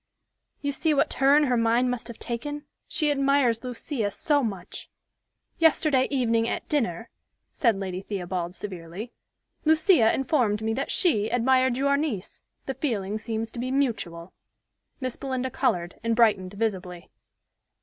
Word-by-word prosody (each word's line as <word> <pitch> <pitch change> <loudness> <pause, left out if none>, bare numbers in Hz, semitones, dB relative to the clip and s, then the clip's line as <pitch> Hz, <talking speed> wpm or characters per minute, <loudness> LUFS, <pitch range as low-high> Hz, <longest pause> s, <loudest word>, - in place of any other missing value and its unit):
You 285 - -1
see 305 +2 +1
what - - +2
turn 280 +3 +4
her 255 -4 +2
mind 235 +2 +2
must 245 -2 -4
have 235 - -8
taken. 290 +5 -5 0.2
She 305 -3 +1
admires 275 -4 +2
Lucia 245 -2 -3
so 290 +7 +1
much." 195 -6 -5 0.7
"Yesterday 310 -5 +3
evening 230 -4 +1
at - - -3
dinner," 230 - -1 0.4
said 235 - +2
Lady 190 -1 -4
Theobald 180 -3 -4
severely, 185 +4 -7 0.5
"Lucia 315 - +5
informed 245 -6 +1
me 220 0 0
that 270 +4 -2
she 220 - +2
admired 255 +1 +2
your 280 +1 +2
niece. 260 -11 -3 0.2
The 270 - -2
feeling 215 -7 -2
seems 225 0 -4
to 240 - -7
be 250 +2 -2
mutual." 215 -11 -2 0.7
Miss 255 -3 -3
Belinda 260 -1 -3
colored, 175 -4 -1
and 230 0 +1
brightened 205 -5 +3
visibly. 185 -5 -3
235 Hz, 140 wpm, -26 LUFS, 210-275 Hz, 0.7 s, Lucia